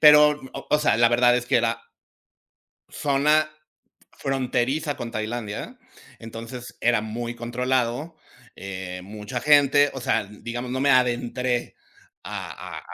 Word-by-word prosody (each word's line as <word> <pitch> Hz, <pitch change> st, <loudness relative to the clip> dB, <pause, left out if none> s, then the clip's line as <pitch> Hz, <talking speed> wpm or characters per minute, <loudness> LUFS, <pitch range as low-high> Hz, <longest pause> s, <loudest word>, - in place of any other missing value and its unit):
Pero, 150 Hz, -1 st, +7 dB, 0.3 s
o 150 Hz, -, +4 dB
sea, 150 Hz, -6 st, +3 dB
la 120 Hz, +1 st, +5 dB
verdad 120 Hz, 0 st, +5 dB
es 120 Hz, -, -1 dB
que 130 Hz, -, +3 dB
era 115 Hz, 0 st, 0 dB, 1.1 s
zona 150 Hz, +2 st, +2 dB, 0.6 s
fronteriza 135 Hz, +2 st, -1 dB
con 115 Hz, -1 st, -5 dB
Tailandia. 110 Hz, -, -4 dB, 0.4 s
Entonces 115 Hz, +2 st, -8 dB
era 120 Hz, -2 st, +3 dB
muy 115 Hz, +2 st, -5 dB
controlado, 125 Hz, +5 st, -1 dB, 0.4 s
eh, 95 Hz, -1 st, -6 dB
mucha 105 Hz, +1 st, -6 dB
gente, 145 Hz, -1 st, +5 dB
o 135 Hz, -, -6 dB
sea, 110 Hz, -, +1 dB
digamos, 120 Hz, +4 st, -6 dB
no 130 Hz, +1 st, -1 dB
me 140 Hz, -, +3 dB
adentré 125 Hz, 0 st, +1 dB, 0.5 s
a -, -, -6 dB
120 Hz, 120 wpm, -24 LUFS, 115-140 Hz, 1.1 s, Pero